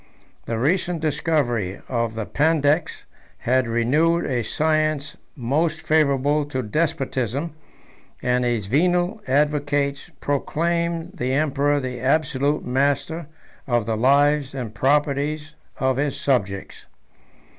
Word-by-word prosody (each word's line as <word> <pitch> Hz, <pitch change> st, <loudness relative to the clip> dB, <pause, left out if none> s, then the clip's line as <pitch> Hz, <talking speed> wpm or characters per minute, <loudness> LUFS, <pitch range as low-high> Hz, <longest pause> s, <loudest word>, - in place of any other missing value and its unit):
The 115 Hz, -, -1 dB
recent 175 Hz, +6 st, +1 dB
discovery 140 Hz, -, 0 dB
of 115 Hz, -3 st, -1 dB
the 110 Hz, -1 st, -3 dB
Pandects 155 Hz, +2 st, +1 dB, 0.3 s
had 130 Hz, 0 st, +1 dB
renewed 150 Hz, +9 st, +2 dB
a 125 Hz, -4 st, 0 dB
science 155 Hz, +3 st, 0 dB, 0.2 s
most 155 Hz, +5 st, 0 dB
favorable 145 Hz, -1 st, +2 dB
to 130 Hz, -3 st, -3 dB
despotism; 135 Hz, +1 st, -1 dB, 0.7 s
and 125 Hz, 0 st, +1 dB
his 120 Hz, -4 st, 0 dB
venal 175 Hz, -, +1 dB
advocates 145 Hz, +1 st, 0 dB
proclaimed 170 Hz, +4 st, -1 dB
the 130 Hz, -9 st, -2 dB
emperor 145 Hz, 0 st, +1 dB
the 125 Hz, -2 st, -4 dB
absolute 145 Hz, +2 st, +1 dB
master 140 Hz, +5 st, 0 dB, 0.4 s
of 120 Hz, -4 st, +1 dB
the 115 Hz, 0 st, -1 dB
lives 140 Hz, +3 st, +3 dB
and 120 Hz, -5 st, -5 dB
properties 145 Hz, +4 st, 0 dB, 0.2 s
of 130 Hz, -1 st, +1 dB
his 145 Hz, 0 st, -1 dB
subjects. 100 Hz, -8 st, -1 dB
145 Hz, 110 wpm, -23 LUFS, 125-155 Hz, 0.7 s, lives